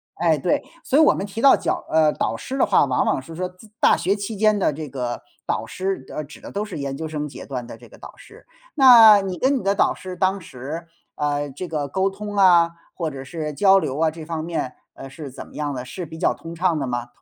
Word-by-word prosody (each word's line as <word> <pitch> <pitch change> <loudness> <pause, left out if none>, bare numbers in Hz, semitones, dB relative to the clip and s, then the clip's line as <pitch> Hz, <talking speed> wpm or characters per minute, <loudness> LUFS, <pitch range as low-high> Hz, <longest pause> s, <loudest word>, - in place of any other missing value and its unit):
哎， 165 -2 +2
对， 170 +5 0 0.2
所 275 - +1
以 - - +7
我 310 - +6
们 195 - -3
提 215 +3 -6
到 275 - +7
脚 - - -2
呃， 155 -1 +4
导 - - -1
师 270 - -5
的 - - +4
话， 200 -7 +4
往 130 -2 +1
往 - - 0
是 160 +4 -11
说 180 +1 -2
自 185 +4 -18
大 - - +5
学 195 +3 0
期 205 +2 -5
间 215 0 +3
的 185 - +2
这 150 0 -7
个 125 -2 -4 0.2
导 - - -2
师 190 -8 -3
呃， 155 - -3
指 150 - -14
的 - - -9
都 205 +1 -2
是 195 -7 -7
研 140 -1 -4
究 160 +2 -5
生 150 -1 -4
阶 - - -10
段 125 -3 -5
的 115 - -10
这 120 - -15
个 - - -16
导 - - -11
师。 - - -16 0.3
那 230 -7 +9
你 190 -2 -4
跟 270 +2 +2
你 - - -5
的 200 +1 +2
导 - - +3
师 185 -1 -8
当 190 +1 +1
时， 155 +5 -7 0.3
呃， 145 -1 -1
这 175 +7 -6
个 150 -3 -2
沟 190 +7 0
通 205 +1 -7
啊， 175 -4 +5 0.2
或 165 -3 -3
者 135 -2 -8
是 150 0 -5
交 195 +4 +5
流 145 -4 -3
啊， 160 -1 +2
这 160 -1 -9
方 160 -1 -4
面， 160 -6 -3 0.2
呃， 135 - -9
是 140 -1 -9
怎 - - -9
么 - - -17
样 145 -2 -2
的， 125 -1 -5
是 175 +7 -6
比 160 +1 -10
较 - - +2
通 165 0 -10
畅 170 -1 +1
的 135 - -2
吗？ 120 -1 -3
165 Hz, 280 characters per minute, -22 LUFS, 145-195 Hz, 0.3 s, 那